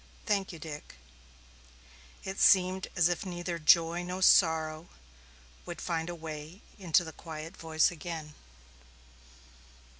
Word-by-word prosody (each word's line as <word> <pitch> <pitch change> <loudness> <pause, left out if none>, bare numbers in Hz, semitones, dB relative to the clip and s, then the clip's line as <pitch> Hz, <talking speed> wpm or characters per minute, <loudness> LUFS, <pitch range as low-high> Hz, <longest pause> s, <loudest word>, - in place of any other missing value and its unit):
"Thank 200 -3 0
you, 170 - -9
Dick." 150 - -9 1.3
It 190 +1 -5
seemed 185 0 +4
as 175 -2 +4
if 175 +3 -2
neither 175 -2 -4
joy 165 +2 +4
nor 180 +1 -4
sorrow 160 -2 +3 0.8
would 175 - -6
find 165 -1 -2
a 175 - -5
way 160 +2 -8 0.2
into 175 -2 +3
the 160 -1 -8
quiet 160 0 -8
voice 160 0 +1
again. 160 -2 -7
170 Hz, 120 wpm, -30 LUFS, 160-180 Hz, 1.3 s, seemed